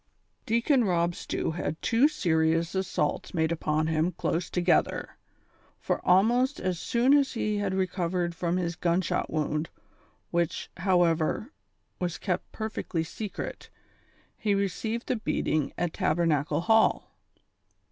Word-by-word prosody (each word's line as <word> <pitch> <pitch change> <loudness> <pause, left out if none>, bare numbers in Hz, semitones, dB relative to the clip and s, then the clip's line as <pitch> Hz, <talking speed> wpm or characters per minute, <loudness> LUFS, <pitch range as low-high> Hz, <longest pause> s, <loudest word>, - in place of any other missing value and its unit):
lEACON 235 +3 +3
ROB 175 -3 +1
STEW - - -3
had 160 -2 -3
two 235 +5 +4
serious 165 - +1
assaults 185 -4 -1
made 160 0 +1
upon 155 -1 0
him 160 +2 +1
close 170 +1 -2
together, 180 0 +1 0.6
for - - -2
almost 240 +9 +3
as 185 -2 -2
soon 245 +8 +2
as 280 -2 +2
he 215 -3 -1
had 195 -2 -1
recovered 180 -2 -1
from 170 +1 -1
his 170 -2 -2
gunshot 175 +1 0
wound, 155 0 -1 0.6
which, 170 -2 -1
however, 175 - +1 0.5
was 175 -2 -2
kept 180 -3 -3
perfectly 215 -6 -3
secret, 200 +5 -6 0.7
he 205 -2 +1
received 215 +4 -2
the 250 - 0
beating 155 -8 -1
at 175 -2 -1
Tabernacle 160 -2 +1
Hall. 220 +5 +3
180 Hz, 125 wpm, -28 LUFS, 165-215 Hz, 0.7 s, two